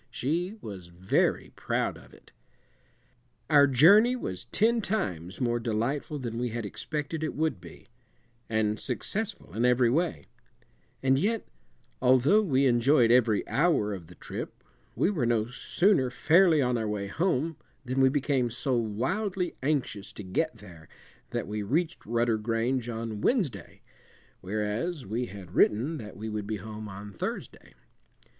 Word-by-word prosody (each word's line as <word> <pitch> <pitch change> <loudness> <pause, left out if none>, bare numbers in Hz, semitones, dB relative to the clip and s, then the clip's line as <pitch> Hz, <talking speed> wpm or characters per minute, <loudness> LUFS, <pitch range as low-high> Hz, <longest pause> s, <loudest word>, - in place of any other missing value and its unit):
She 175 - -2
was 95 -5 -8
very 85 +2 0
proud - - -1
of - - -15
it. - - -19 1.2
Our 145 -1 +7
journey 200 - +6
was 95 - -5
ten 230 +2 +2
times 95 - -3
more 120 -2 +1
delightful 120 +6 -2
than 120 -4 -4
we 125 0 -1
had 115 -1 -4
expected 150 - -4
it 155 - -3
would 155 - -1
be, 85 -2 -13 0.6
and 110 -1 0
successful 190 - -4
in 115 - 0
every 125 -1 +4
way; 145 - 0 0.8
and 135 0 +3
yet, 220 +6 0 0.6
although 130 - +5
we 140 -9 +2
enjoyed 120 0 +4
every 120 -4 +3
hour 140 -10 +2
of 90 -4 -8
the 90 - -14
trip, - - -7 0.3
we 190 - +2
were 145 - 0
no 115 0 +1
sooner 170 +1 +2
fairly 160 +3 +4
on 125 -1 +1
our 110 - -2
way 105 -1 -2
home 160 - -1 0.3
than 130 +2 0
we 130 - +6
became 135 -3 +1
so 125 +3 -1
wildly 165 - -1
anxious 130 -8 -1
to 105 - -8
get 140 - -1
there 85 -6 -14 0.4
that - - -3
we 105 +1 -3
reached 160 - -1
Rudder 115 -1 +1
Grange 115 +3 -1
on 110 -2 -4
Wednesday, 210 - -1 0.6
whereas 110 - -3
we 115 +5 -2
had 95 -3 -10
written 130 +13 +2
that 105 -6 -9
we 110 +2 -5
would 105 -2 -4
be 110 0 -2
home 105 +1 -8
on 100 +1 -9
Thursday. - - -6
120 Hz, 150 wpm, -28 LUFS, 105-155 Hz, 1.2 s, Our